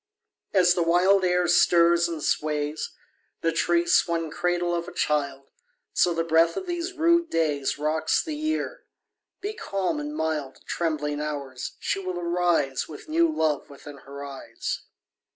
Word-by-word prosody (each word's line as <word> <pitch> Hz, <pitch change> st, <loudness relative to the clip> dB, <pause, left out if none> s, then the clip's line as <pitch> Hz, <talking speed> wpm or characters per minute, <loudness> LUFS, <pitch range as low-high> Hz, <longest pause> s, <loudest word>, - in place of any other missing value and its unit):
3. 190 Hz, -, +5 dB
As 175 Hz, 0 st, +5 dB
the 175 Hz, -, 0 dB
wild 180 Hz, +4 st, +4 dB
air 180 Hz, -1 st, +2 dB
stirs 170 Hz, 0 st, +5 dB
and 160 Hz, -3 st, -5 dB
sways 150 Hz, 0 st, -1 dB, 0.5 s
The 165 Hz, -, +2 dB
tree 170 Hz, +1 st, +2 dB
swung 165 Hz, -2 st, +2 dB
cradle 175 Hz, 0 st, 0 dB
of 170 Hz, 0 st, -2 dB
a -, -, -7 dB
child, 145 Hz, -4 st, -1 dB, 0.5 s
So 175 Hz, -, +3 dB
the 165 Hz, 0 st, 0 dB
breath 165 Hz, +1 st, +3 dB
of -, -, -3 dB
these 350 Hz, +1 st, -3 dB
rude 340 Hz, 0 st, +3 dB
days 150 Hz, -4 st, 0 dB
_15 145 Hz, -, -10 dB
Rocks 160 Hz, +1 st, +1 dB
the 315 Hz, -2 st, -4 dB
Year: 310 Hz, +1 st, -2 dB, 0.6 s
be 410 Hz, +3 st, -3 dB
calm 195 Hz, -, -2 dB
and 295 Hz, 0 st, -5 dB
mild, 155 Hz, -4 st, -2 dB
Trembling 150 Hz, -3 st, -2 dB
Hours, 140 Hz, -4 st, -5 dB
she -, -, -2 dB
will 185 Hz, -2 st, -4 dB
arise 170 Hz, -6 st, +1 dB
With 155 Hz, -, -11 dB
new 330 Hz, +1 st, +3 dB
love 155 Hz, -, 0 dB
within 145 Hz, 0 st, -11 dB
her 140 Hz, +1 st, -9 dB
eyes. 135 Hz, -1 st, -5 dB
170 Hz, 160 wpm, -26 LUFS, 150-185 Hz, 0.6 s, 3